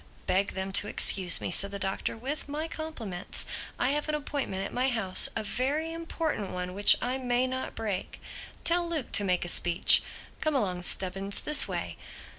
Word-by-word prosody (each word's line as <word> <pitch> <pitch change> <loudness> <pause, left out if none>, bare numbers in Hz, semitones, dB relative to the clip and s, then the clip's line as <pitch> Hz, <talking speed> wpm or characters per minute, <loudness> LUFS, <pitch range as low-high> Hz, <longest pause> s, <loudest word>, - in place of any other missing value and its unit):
"Beg 195 +2 -1
them 190 0 -5
to 200 +1 +2
excuse 185 -3 +5
me," - - -5
said 200 +3 +4
the 200 - -7
Doctor—"with 230 +9 -5
my 305 +3 -4
compliments. 235 - -3 0.3
I 250 - 0
have 295 +2 -2
an 305 - 0
appointment 280 -10 -5
at - - -8
my 255 +2 0
house—a 220 -3 +4
very 290 +9 -3
important 325 - -5
one 180 0 -6
which 205 +2 +7
I 255 +2 -3
may 250 0 -1
not 260 0 -6
break. 205 -4 -6 0.4
Tell 345 0 0
Luke 315 -7 -4
to 205 - +4
make 180 -2 -1
a - - -7
speech. 175 0 +5 0.4
Come 310 -1 -2
along, 185 -8 -2
Stubbins, 195 +2 +1
this 300 0 +4
way." - - -6
225 Hz, 175 wpm, -27 LUFS, 195-295 Hz, 0.4 s, which